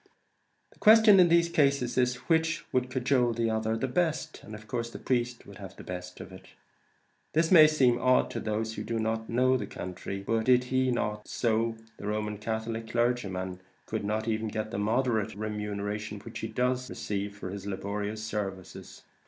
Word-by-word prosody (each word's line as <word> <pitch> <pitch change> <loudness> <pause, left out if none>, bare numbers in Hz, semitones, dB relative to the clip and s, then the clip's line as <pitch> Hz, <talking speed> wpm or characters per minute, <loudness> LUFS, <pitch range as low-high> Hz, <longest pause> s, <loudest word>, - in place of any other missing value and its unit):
The - - -27
question 215 -2 +7
in 180 - +7
these 170 0 +4
cases 140 -6 +1
is, 125 -1 +2
which 160 0 +1
would 125 0 +1
cajole 125 -1 +1
the 115 0 0
other 110 0 0
the 130 - -1
best, 160 +2 -1
and 110 - -9
of 105 0 -11
course 115 +1 -3
the - - -8
priest 120 -1 -1
would 100 0 -12
have 95 -1 -9
the - - -11
best 90 0 -7
of 95 - -9
it. 95 - -13 0.9
This 160 +1 +2
may 155 -4 +9
seem 130 -6 +3
odd 130 0 +3
to - - -3
those 110 +1 -2
who - - -5
do 115 - -3
not 110 0 -2
know 130 +2 +3
the 105 -5 -5
country; 95 +2 -6
but 115 +1 0
did 125 -1 +5
he 130 +1 +1
not 105 -3 -2
do - - -16
so, 115 -1 0 0.2
the 105 - -7
Roman 105 -1 -2
Catholic 110 +1 -4
clergyman 100 -7 -1 0.2
could 110 -1 -3
not 105 +2 -1
get 115 - -1
even 110 0 -1
the 110 -1 -3
moderate 110 0 0
remuneration 105 0 -4
which 115 +2 -8
he 110 - -3
does 125 +3 -1
receive 100 0 -4
for 95 -3 -6
his 100 0 -7
laborious 100 +2 -4
services. 100 -4 -6
110 Hz, 190 wpm, -29 LUFS, 105-125 Hz, 0.9 s, may